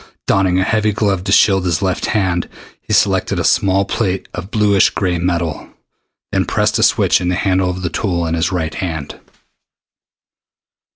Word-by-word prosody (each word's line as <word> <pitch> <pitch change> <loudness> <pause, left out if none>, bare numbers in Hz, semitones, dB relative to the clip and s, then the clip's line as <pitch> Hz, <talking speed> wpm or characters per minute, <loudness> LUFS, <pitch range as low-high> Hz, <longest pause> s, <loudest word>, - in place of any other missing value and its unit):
Donning 95 -2 +2
a 95 - +2
heavy 110 +1 +1
glove 100 -3 0
to 100 - -2
shield 95 -2 +4
his 85 0 -1
left 95 -2 -1
hand, 95 -5 -1 0.3
he - - -9
selected - - +1
a - - -1
small 95 0 +2
plate 95 -3 -2
of 90 +3 -7
bluish 105 -3 +3
gray 90 -3 -2
metal, 85 -3 -2 0.6
then - - 0
pressed - - 0
a - - +2
switch - - +3
in 90 - -2
the 90 - 0
handle 95 -1 +1
of 90 0 -5
the 90 - -1
tool 85 -5 -1
in 80 - -2
his 85 +3 0
right 80 -3 -2
hand. 80 -6 -5
95 Hz, 175 wpm, -17 LUFS, 85-100 Hz, 0.6 s, shield